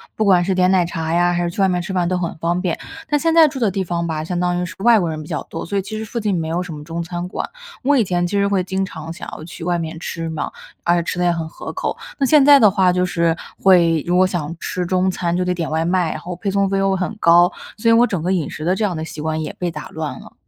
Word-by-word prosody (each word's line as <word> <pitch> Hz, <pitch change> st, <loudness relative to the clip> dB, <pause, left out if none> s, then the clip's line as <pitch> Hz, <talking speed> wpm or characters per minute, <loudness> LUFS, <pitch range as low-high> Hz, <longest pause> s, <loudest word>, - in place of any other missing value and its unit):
不 220 Hz, -, 0 dB
管 185 Hz, -3 st, +4 dB
是 190 Hz, 0 st, 0 dB
点 185 Hz, 0 st, +3 dB
奶 185 Hz, -2 st, +3 dB
茶 165 Hz, -2 st, -3 dB
呀， 175 Hz, +1 st, +3 dB
还 175 Hz, 0 st, 0 dB
是 170 Hz, -, 0 dB
去 195 Hz, -, -3 dB
外 195 Hz, -, +5 dB
面 180 Hz, -1 st, 0 dB
吃 190 Hz, -, -6 dB
饭 180 Hz, -2 st, 0 dB
都 185 Hz, +1 st, 0 dB
很 170 Hz, -2 st, -2 dB
方 170 Hz, +2 st, -1 dB
便。 175 Hz, -4 st, -2 dB, 0.3 s
但 295 Hz, -, +2 dB
现 330 Hz, +2 st, +1 dB
在 325 Hz, -1 st, +7 dB
住 270 Hz, -, -6 dB
的 225 Hz, -4 st, +2 dB
地 190 Hz, 0 st, -2 dB
方 170 Hz, -1 st, -2 dB
吧， 155 Hz, -1 st, -2 dB
相 175 Hz, +2 st, -3 dB
当 180 Hz, 0 st, 0 dB
于 -, -, -1 dB
是 175 Hz, -, -8 dB
外 235 Hz, +2 st, +5 dB
国 175 Hz, -, -1 dB
人 155 Hz, -1 st, -4 dB
比 150 Hz, -, -10 dB
较 150 Hz, -4 st, -3 dB
多， -, -, -5 dB
所 200 Hz, +4 st, -2 dB
以 195 Hz, -, +1 dB
其 215 Hz, +3 st, -6 dB
实 220 Hz, -, -4 dB
附 235 Hz, -, -4 dB
近 210 Hz, -2 st, 0 dB
没 160 Hz, -, -2 dB
有 170 Hz, +3 st, -1 dB
什 175 Hz, -3 st, -7 dB
么 150 Hz, -, -8 dB
中 165 Hz, +1 st, -4 dB
餐 175 Hz, +1 st, -5 dB
馆。 -, -, -4 dB, 0.4 s
我 280 Hz, +2 st, +3 dB
以 240 Hz, -, +4 dB
前 175 Hz, -2 st, 0 dB
其 200 Hz, +3 st, -1 dB
实 200 Hz, -, +2 dB
会 195 Hz, -2 st, +1 dB
经 190 Hz, +1 st, -1 dB
常 165 Hz, -3 st, -8 dB
想 175 Hz, -, -8 dB
要 -, -, -8 dB
去 165 Hz, +1 st, -9 dB
外 175 Hz, 0 st, 0 dB
面 160 Hz, -1 st, -5 dB
吃 165 Hz, -1 st, -4 dB
嘛， 160 Hz, -, -4 dB, 0.3 s
而 175 Hz, -, +3 dB
且 170 Hz, -, 0 dB
吃 175 Hz, -, -3 dB
得 180 Hz, -, +2 dB
也 175 Hz, -, +4 dB
很 165 Hz, -1 st, -3 dB
合 -, -, -7 dB
口， -, -, -3 dB, 0.2 s
那 275 Hz, -, +1 dB
现 290 Hz, +1 st, +5 dB
在 285 Hz, 0 st, +8 dB
的 215 Hz, -5 st, +7 dB
话， 190 Hz, -2 st, +3 dB
就 180 Hz, 0 st, +1 dB
是 170 Hz, -2 st, +1 dB, 0.3 s
会 170 Hz, -5 st, +4 dB
如 175 Hz, -, +2 dB
果 185 Hz, +1 st, +5 dB
想 170 Hz, -3 st, -3 dB
吃 180 Hz, -1 st, -3 dB
中 185 Hz, +1 st, +1 dB
餐 175 Hz, -1 st, -1 dB
就 180 Hz, -, +1 dB
得 180 Hz, -, 0 dB
点 170 Hz, -3 st, -3 dB
外 160 Hz, +1 st, 0 dB
卖， 175 Hz, -1 st, +1 dB
然 -, -, -5 dB
后 180 Hz, 0 st, -6 dB
配 195 Hz, +3 st, -3 dB
送 200 Hz, 0 st, +1 dB
费 195 Hz, -, 0 dB
又 195 Hz, 0 st, +2 dB
很 185 Hz, +3 st, -3 dB
高， 175 Hz, 0 st, +5 dB, 0.3 s
所 230 Hz, +2 st, +1 dB
以 230 Hz, -, +6 dB
我 235 Hz, +2 st, +6 dB
整 190 Hz, -8 st, -2 dB
个 180 Hz, +3 st, -1 dB
饮 175 Hz, -5 st, 0 dB
食 155 Hz, -, -7 dB
的 180 Hz, +2 st, +2 dB
这 215 Hz, -, -2 dB
样 185 Hz, -4 st, -1 dB
的 160 Hz, -, -4 dB
习 155 Hz, -, -8 dB
惯 155 Hz, 0 st, -2 dB
也 155 Hz, -, -4 dB
被 180 Hz, -, -1 dB
打 150 Hz, -2 st, -7 dB
乱 160 Hz, -2 st, -5 dB
了。 -, -, -14 dB
180 Hz, 345 characters per minute, -20 LUFS, 170-190 Hz, 0.4 s, 在